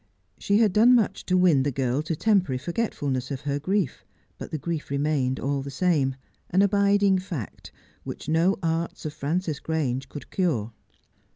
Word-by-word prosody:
She 200 - +2
had 215 -4 +3
done 235 +5 +6
much 210 -5 0
to 185 - +3
win 175 -7 +4
the 140 +2 0
girl 130 +1 0
to 160 +1 -3
temporary 185 -8 +2
forgetfulness 140 - -2
of 135 -1 -4
her 145 -1 -2
grief, 185 0 -1 0.4
but - - -7
the 155 - -3
grief 160 +1 -4
remained 140 -2 0
all 140 0 -1
the 140 - -6
same, 140 -3 +1 0.3
an 190 +3 +3
abiding 200 -1 +3
fact, 165 - -7 0.3
which - - -7
no 165 +5 +2
arts 165 0 -2
of 150 - -3
Frances 155 +1 -2
Grange 135 -5 -2
could 145 - -10
cure. 125 - -1
160 Hz, 170 wpm, -25 LUFS, 140-185 Hz, 0.4 s, done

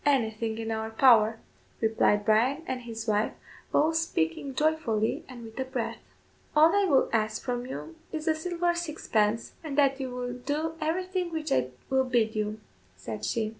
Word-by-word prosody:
"Anything 225 -5 +1
in 225 0 -3
our 220 0 -2
power," 225 -2 +5 0.4
replied 220 -2 +2
Bryan 245 +9 +3
and 255 -1 -3
his 230 -1 -6
wife, 210 0 +1 0.4
both 315 +2 +3
speaking 270 - -1
joyfully, 275 -9 +1
and 245 -2 -9
with 225 +2 -10
a - - +1
breath. 260 -3 -3 0.6
"All 315 +4 +6
I 405 -1 +4
will 285 -8 +4
ask 215 -1 +1
from 245 -1 -2
you 320 +5 -6 0.2
is 315 -1 -4
a 320 - +5
silver 345 +2 0
sixpence, 230 -10 0
and 295 -3 -5
that 275 -1 +4
you 265 -1 -3
will 250 0 -4
do 295 +6 -2
everything 365 +2 -1
which 315 -2 -3
I 130 - +2 0.2
will 265 0 +3
bid 235 -4 +1
you," 215 0 -2 0.4
said 105 +3 -7
she. 220 -2 0
250 Hz, 170 wpm, -28 LUFS, 220-310 Hz, 0.6 s, All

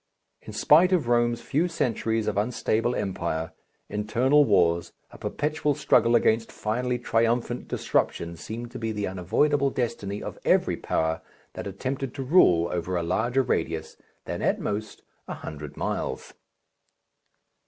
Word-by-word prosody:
In - - -9
spite 170 +5 +5
of 165 -9 +2
Rome's 120 -1 +2
few 155 +6 +1
centuries 115 -8 -1
of 105 - -1
unstable 115 +2 0
empire, 80 -4 -2 0.3
internal 120 +8 +3
wars, 85 -6 +2 0.2
a - - -13
perpetual 150 -1 -1
struggle 115 -1 +3
against 115 -1 +2
finally 125 +3 -1
triumphant 120 +1 0
disruption 85 0 -1
seemed 115 +7 -7
to 130 - -7
be 115 -1 -2
the 105 -1 -2
unavoidable 125 - +1
destiny 110 -6 -3
of - - -7
every - - +3
power 80 0 -1 0.3
that - - -6
attempted 130 +6 -4
to 135 - -3
rule 90 - +5
over 90 +1 -2
a 85 - -1
larger 120 +10 +1
radius 80 -7 -2 0.3
than - - -4
at - - +1
most 105 +1 -4 0.2
a - - -4
hundred 75 -1 -8
miles. - - -3
115 Hz, 140 wpm, -26 LUFS, 95-125 Hz, 0.3 s, spite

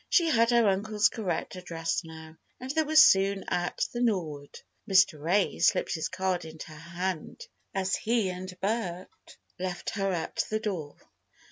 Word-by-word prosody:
She 340 -3 +4
had 230 -5 +3
her 235 -2 +4
uncle's 210 +2 +2
correct 210 -5 -3
address 170 -2 -3
now, 160 -1 -11 0.2
and 255 +1 -5
they 315 +2 +2
were 310 0 -3
soon 195 -9 +6
at 175 0 -1
"The 240 - -3
Norwood." 160 -11 -2 0.3
Mr. 190 -5 +4
Ray 190 +5 +1
slipped - - +2
his 160 -3 -2
card 185 -1 -1
into 160 0 -9
her - - -9 0.3
hand 185 -3 -3 0.3
as 190 -1 0
he 220 -4 0
and 180 0 -8
Bert 190 -4 -2 0.5
left 180 -1 -3
her 195 -2 -1
at 165 -3 -2
the 215 - 0
door. 180 -9 -4
190 Hz, 160 wpm, -28 LUFS, 175-215 Hz, 0.5 s, soon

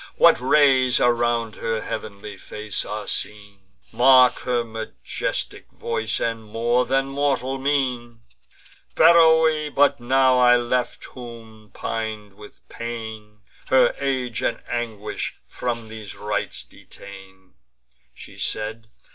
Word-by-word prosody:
What - - +5
rays 130 -2 +4
around 120 -2 +1
her 110 -1 -2
heav'nly 105 -1 -7
face 105 +2 -5
are 105 0 -5
seen! 105 -1 -5 0.3
Mark 130 0 +5
her 125 -2 -1
majestic 110 -1 -5
voice, 110 -1 -2
and 115 -1 -2
more 120 +3 0
than 135 +1 +1
mortal 135 -1 -1
mien! 125 -4 -1 0.7
Beroe 160 -2 +5
but 145 -1 +3
now 130 +1 +3
I 125 0 +6
left, 120 +1 -2
whom, 115 -3 -12
pin'd 110 -2 -4
with 105 +1 -16
pain, 110 -2 -8 0.3
Her 130 - +4
age 130 -4 -2
and 115 - -2
anguish 110 -3 -4
from 115 -2 -4
these 110 -2 -9
rites 105 0 -3
detain," 95 -1 -14 0.6
She - - -13
said. 110 +1 -3
115 Hz, 115 wpm, -23 LUFS, 110-130 Hz, 0.7 s, I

